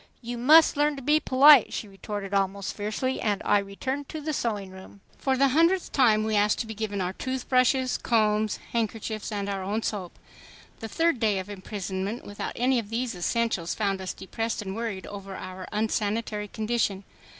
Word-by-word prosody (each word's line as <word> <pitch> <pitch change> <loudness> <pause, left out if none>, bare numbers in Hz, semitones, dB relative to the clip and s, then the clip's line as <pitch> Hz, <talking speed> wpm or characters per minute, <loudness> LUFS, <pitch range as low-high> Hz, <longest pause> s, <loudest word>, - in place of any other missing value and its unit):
"You 240 +1 -4
must 310 +5 +6
learn 295 0 +2
to 275 - -8
be 300 +3 +4
polite," 275 -2 +7
she 215 - -4
retorted 200 0 -6
almost 195 0 -1
fiercely, 215 +6 -2
and 205 -3 0
I 205 - +4
returned 260 +8 -4
to 315 - -5
the 305 +1 -3
sewing 210 -7 -2
room. 190 +1 -13 0.2
For 265 -1 +1
the 275 +1 +4
hundredth 335 +6 +2
time 220 -5 +4
we 220 0 0
asked 205 0 +3
to - - -4
be 220 - -6
given 205 -2 -3
our 180 0 -2
toothbrushes, 260 +2 +1
combs, 215 -2 +1 0.2
handkerchiefs 220 -1 -2
and 200 -1 -3
our 195 -1 -2
own 205 +4 -2
soap. 190 -5 -4 0.6
The 225 - -5
third 330 +1 +1
day 215 -3 +2
of 190 +2 -5
imprisonment 195 +2 -5
without 205 - -5
any 250 +1 +2
of 210 -3 -7
these 235 +2 -2
essentials 180 -1 -1
found 195 -3 -1
us 185 - -4
depressed 225 +3 -3
and 190 -1 -5
worried 225 -4 -4
over 195 -1 -8
our 185 0 -7
unsanitary 210 0 -1
condition. 215 -2 -1
215 Hz, 185 wpm, -26 LUFS, 200-250 Hz, 0.6 s, polite